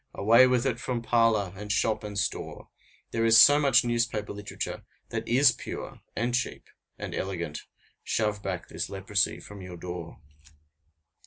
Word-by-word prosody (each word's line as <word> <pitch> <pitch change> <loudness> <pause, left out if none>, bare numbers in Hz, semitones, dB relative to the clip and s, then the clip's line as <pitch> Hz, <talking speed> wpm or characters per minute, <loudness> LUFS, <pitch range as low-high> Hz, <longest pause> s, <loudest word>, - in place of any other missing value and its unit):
Away 115 +5 +6
with 125 0 +1
it 125 -3 0
from 125 -2 -3
parlor, 115 -5 +2
and 105 +2 -6
shop, 110 0 +1
and 105 -1 -6
store! 100 - -3 0.4
There 115 - 0
is 115 0 +7
so 145 +5 +8
much 140 -5 +4
newspaper 115 -3 -1
literature 105 0 -6 0.3
that - - -4
is 130 +2 +5
pure, - - -8
and 120 +2 -1
cheap, 130 +2 -2 0.3
and - - -6
elegant; 85 -5 -4 0.4
shove 105 -2 -1
back 95 -3 -4
this - - -5
leprosy 100 +2 -1
from 100 -1 -11
your 90 -1 -9
door. 85 -1 -7
110 Hz, 155 wpm, -27 LUFS, 100-120 Hz, 0.4 s, so